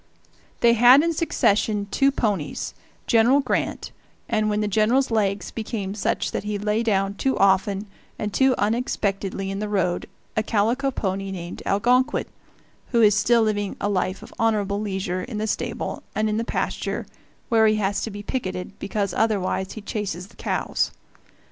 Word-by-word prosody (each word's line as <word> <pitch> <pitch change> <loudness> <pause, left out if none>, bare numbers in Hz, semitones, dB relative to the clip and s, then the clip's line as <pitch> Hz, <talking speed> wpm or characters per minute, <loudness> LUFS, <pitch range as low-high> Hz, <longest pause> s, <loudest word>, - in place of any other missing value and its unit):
They 235 -1 +6
had 245 +5 +7
in 335 0 +1
succession 210 -9 +1
two 275 0 +4
ponies, 205 - -2 0.3
General 235 +4 +4
Grant 280 - -2 0.4
and, 215 -2 +1
when 210 0 0
the 210 - 0
General's 225 +6 +2
legs 200 -3 0
became 210 -3 -4
such 220 +2 -1
that - - -3
he 210 0 -2
lay 210 +2 0
down 195 -3 +1
too 265 +6 0
often 195 +1 +2 0.3
and 210 -1 -3
too 265 -1 +4
unexpectedly 200 -3 -1
in 195 - -3
the 210 0 -3
road, 180 -3 0 0.3
a 215 - +2
calico 230 +5 +1
pony 195 -5 -2
named 175 -2 -6
Algonquin, 245 +6 +2 0.6
who 235 -2 +3
is 210 -1 +6
still 225 +3 +3
living 205 -2 -1
a 205 - 0
life 185 -1 -1
of - - -12
honorable 210 -3 +1
leisure 190 -3 -2
in 225 +1 -6
the 215 - -1
stable 220 - -3
and 215 0 +1
in 215 0 0
the 230 - 0
pasture - - -2 0.4
where 225 -1 +5
he 215 - +3
has 200 -1 0
to - - -3
be 205 -1 -7
picketed, 185 -5 -4
because 200 -2 -2
otherwise 195 -3 0
he 220 - -7
chases 200 -3 -4
the - - -20
cows. - - -1
210 Hz, 165 wpm, -24 LUFS, 195-230 Hz, 0.6 s, had